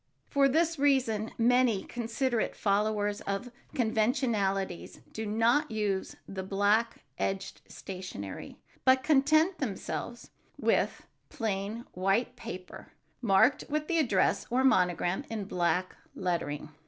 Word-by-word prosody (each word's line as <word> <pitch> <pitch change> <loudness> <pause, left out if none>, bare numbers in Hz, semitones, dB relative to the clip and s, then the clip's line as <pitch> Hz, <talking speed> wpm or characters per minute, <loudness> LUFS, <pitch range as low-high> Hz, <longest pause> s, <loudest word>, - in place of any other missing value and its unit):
For 280 -1 +4
this 325 +2 +1
reason 250 -6 +2
many 240 -3 +3
considerate 240 0 -1
followers 205 0 0
of 200 +5 -3 0.2
conventionalities 215 - 0
do 220 0 -4
not 235 +8 +2
use 205 -3 -2
the 190 -1 -5
black 205 +4 +1 0.2
edged 195 0 -3
stationery, 180 - -7 0.3
but 260 0 +4
content 310 +5 +3
themselves 240 0 -4 0.3
with - - +1 0.2
plain 215 0 -3
white 195 +7 +1
paper 185 -7 -9 0.3
marked 235 +4 +4
with 305 +1 -1
the 335 -1 +1
address 290 -7 +2
or 255 +2 +2
monogram 180 -3 +2
in 220 -2 -3
black 180 -1 0 0.2
lettering. 170 -6 -2
220 Hz, 110 wpm, -30 LUFS, 195-255 Hz, 0.3 s, For